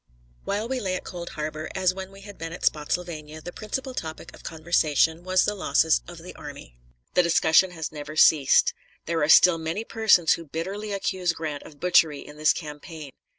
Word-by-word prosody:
While 210 +3 -2
we 260 +1 -2
lay 190 -5 -2
at - - -5
Cold 175 -1 -7
Harbor, 155 +1 -4
as 185 -1 +2
when 190 0 -8
we 195 0 -14
had 205 0 -12
been 165 0 -5
at 180 - -5
Spottsylvania, 155 0 -2
the 175 +3 -8
principal 260 +5 -5
topic 160 -4 -7
of - - -14
conversation 160 0 +1
was 185 0 +2
the 210 - 0
losses 120 - +2
of - - -10
the - - -10
army. - - -11 0.3
The - - +5
discussion 170 +1 +4
has 160 -4 -6
never 150 0 -8
ceased. 155 -3 +5 0.3
There 165 0 -1
are 150 - +1
still 170 0 +7
many 160 +7 -3
persons 220 -8 +3
who 165 - -6
bitterly 195 +8 -5
accuse 185 -3 -1
Grant 155 -3 -5
of 145 -2 -14
butchery 165 -4 +3
in 150 - -12
this 155 0 +4
campaign. 150 -1 -7
165 Hz, 195 wpm, -25 LUFS, 155-185 Hz, 0.3 s, still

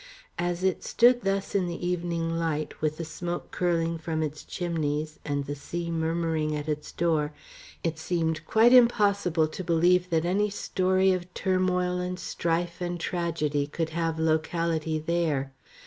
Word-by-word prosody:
As 175 +1 -1
it 190 -1 +1
stood 245 +1 +4
thus 195 -1 -1
in 190 -3 +1
the 175 0 -4
evening 170 -2 -1
light, 160 -2 -2
with 155 0 0
the 165 - -4
smoke 175 +2 -5
curling 165 -2 0
from 160 -1 -2
its 150 0 -4
chimneys, 155 -3 -2
and 145 -1 -2
the 145 - -3
sea 170 +4 -5
murmuring 160 -1 0
at 150 0 -4
its 150 -1 -3
door, 155 -3 0 0.5
it 165 -2 -2
seemed 160 -2 -1
quite 230 +3 +5
impossible 200 -9 +4
to 185 - -6
believe 175 +1 +3
that 165 -1 +1
any 200 +4 +2
story 190 -1 +2
of 180 -1 -2
turmoil 180 -1 +1
and 180 0 -3
strife 170 +1 -2
and 175 0 -2
tragedy 165 -5 -1
could 160 +2 -2
have 165 0 -1
locality 160 0 0
there. 155 -4 0
170 Hz, 155 wpm, -27 LUFS, 160-180 Hz, 0.5 s, quite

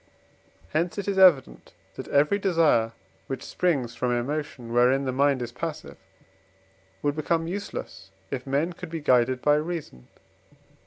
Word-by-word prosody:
Hence 170 +4 -1
it 200 - -4
is 195 -1 0
evident 170 -9 +4 0.2
that - - -8
every 150 +8 +2
desire 160 - +2 0.3
which 135 - -5
springs 140 -10 0
from 120 +1 -1
emotion, 125 -1 -3
wherein 125 +3 +3
the 130 - -1
mind 135 -1 +2
is 120 - -6
passive, 155 +5 -6 1.1
would 145 0 0
become 165 +2 0
useless, 165 - -6 0.2
if 135 -1 -4
men 145 +6 0
could 180 0 -9
be 165 0 -4
guided 125 -2 +2
by 145 - +4
reason. 150 - -5
145 Hz, 145 wpm, -26 LUFS, 125-165 Hz, 1.1 s, evident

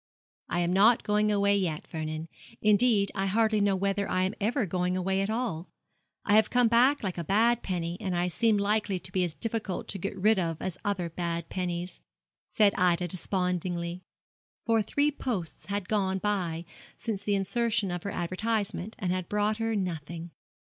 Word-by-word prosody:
'I 175 - 0
am 175 +1 +1
not 215 +5 +5
going 210 0 +2
away 200 0 +3
yet, 175 -6 -1
Vernon; 155 0 -5 0.3
indeed, 210 -1 +4
I 195 0 -1
hardly 215 +1 +2
know 200 -1 +3
whether 200 +1 -1
I 185 0 +1
am 190 - 0
ever 230 +3 +1
going 180 0 -1
at 195 +2 0
all. 220 -8 -2 0.6
I 205 - +2
have 220 - +4
come 245 -1 +4
back 250 +4 +4
like 185 -3 -2
a - - -2
bad 225 +7 +3
penny, 175 -2 -3
and 185 -4 -1
I 175 +1 +1
seem 215 +5 +2
likely 205 -1 +1
to 180 - -9
be 185 -2 +1
as 170 -3 -3
difficult 225 -4 -3
to 195 - -5
get 195 +2 -4
rid 210 +2 +3
of 165 -3 -2
as 185 -2 -3
other 195 -4 -1
bad 170 -1 -3
pennies,' 180 -1 -3 0.5
said 205 -2 +4
Ida, 180 -1 +2
despondingly, 180 -1 -2 0.6
for 225 -2 +3
three 285 +7 +1
posts 220 - -4
had 200 -1 -3
gone 190 -3 +1
by 185 -5 -1 0.3
since 210 -4 -3
the 205 0 0
insertion 220 0 0
of 175 -1 -3
her 200 - -4
advertisement, 200 +2 -2
and 190 -7 -1
had 185 -1 -2
brought 210 +1 +1
her 225 0 -1
nothing. 170 -3 -4
195 Hz, 180 wpm, -28 LUFS, 180-215 Hz, 0.6 s, not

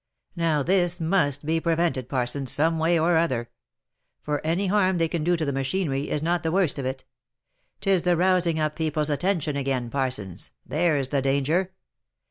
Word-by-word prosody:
Now 165 -4 +1
this 180 +1 +1
must 160 -5 0
be 160 +1 +1
prevented, 165 -6 0
Parsons, 130 +1 -1
some 160 +2 +1
way 165 +2 +3
or 165 +1 +3
other; 125 -8 -1 0.7
for 150 -1 -2
any 170 +5 0
harm 190 -1 +2
they 165 -1 +2
can 165 -1 -3
do 175 +2 +2
the 155 -4 -1
machinery, 135 0 -1
is 150 - -1
not 175 +1 +1
the 160 - -1
worst 180 -6 +1
of 130 - -2
it. 130 0 -5 0.4
— - - -47
Tis 195 -3 +2
the 175 -1 +2
rousing 175 -2 +2
up 155 0 -1
people's 155 -1 -1
attention 160 -1 0
again, 130 -4 -2
Parsons, 125 -10 -3
there's 150 -4 0
the 140 -1 0
danger. 145 +8 0
160 Hz, 175 wpm, -25 LUFS, 140-175 Hz, 0.7 s, way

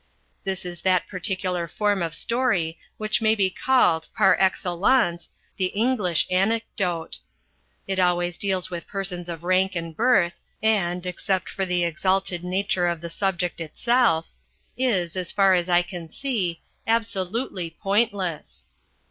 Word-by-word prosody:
This 190 -2 -3
is 175 -1 -7
that 185 -2 +2
particular 185 -2 -2
form 205 +2 0
of 165 -1 -2
story 190 -7 0 0.2
which 215 +2 0
may 220 0 +4
be 195 -3 +1
called, 175 -10 +2
par 195 -3 +6
excellence, 185 +1 +2 0.3
the 185 - +1
English 205 -5 +1
Anecdote. 190 -3 0 0.7
It 190 -1 -2
always 175 -1 +2
deals 190 -1 -1
with 170 -1 -6
persons 185 -3 -4
of 165 -1 -6
rank 185 +1 +2
and 165 -1 -4
birth, 225 -7 +3 0.2
and, 185 -5 +1
except 185 +1 -1
for 195 -1 -2
the 180 -1 +1
exalted 185 +2 0
nature 185 0 0
of 170 -1 -1
the 170 -1 -6
subject 180 -2 -1
itself, 195 0 +2 0.5
is, 195 -9 0
as 185 -2 -3
far 195 -2 +4
as 180 0 +1
I 175 0 +4
can 175 -2 -8
see, 195 - -2 0.2
absolutely 220 -4 -1
pointless. 190 - -1
185 Hz, 140 wpm, -24 LUFS, 175-205 Hz, 0.7 s, par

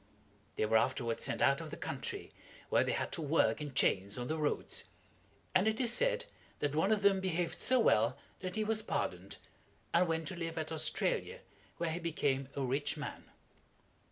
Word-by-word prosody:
They - - +1
were 110 +1 +4
afterward 120 -1 0
sent - - +3
out - - +4
of - - -7
the - - -7
country, - - -5 0.4
where - - +4
they - - -1
had - - -2
to - - -3
work 155 +1 +2
in 145 -3 -6
chains 100 -5 +2
on 125 0 -4
the 160 - -1
roads; 150 -1 -2 0.7
and 185 +3 +4
it 220 0 +1
is 240 -2 +4
said - - +2 0.3
that 145 -1 -1
one 190 +7 +2
of 210 -2 +2
them 200 -1 +5
behaved 175 -3 -1
so 255 0 +5
well 120 - +3 0.2
that 185 +1 -5
he 215 - 0
was 220 0 +1
pardoned, 220 - -3 0.6
and 175 +1 +4
went 165 -1 -1
to 185 - -6
live 165 -1 -4
at 155 0 -3
Australia, 160 - 0 0.4
where 170 -1 -1
he 170 - -3
became 140 -5 -1
a 140 - -1
rich 140 +4 -1
man. 140 -2 -6
160 Hz, 190 wpm, -34 LUFS, 140-190 Hz, 0.7 s, them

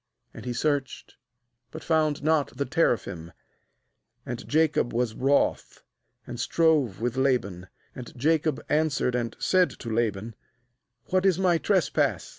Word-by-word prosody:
7 - - -17
And - - -11
he 125 - -2
searched, 140 +1 -2 0.6
but 160 - -9
found 155 -3 +1
not 155 -2 +1
the 140 - -1
teraphim. 100 - -1 0.9
36And 120 -3 -6
Jacob 155 -5 +1
was 120 -2 0
wroth, 135 +4 0 0.4
and 120 -1 -8
strove 145 - +1
with 120 +1 -2
Laban. 110 -9 0 0.3
And 125 -2 -9
Jacob 155 +2 0
answered 150 -4 +1
and 120 -2 -2
said 185 -1 +2
to 115 -2 -7
Laban: 110 -1 -1 0.8
'What 185 0 +2
is 190 -3 +3
my 180 -3 +2
trespass? 190 -4 0
135 Hz, 135 wpm, -26 LUFS, 120-160 Hz, 0.9 s, is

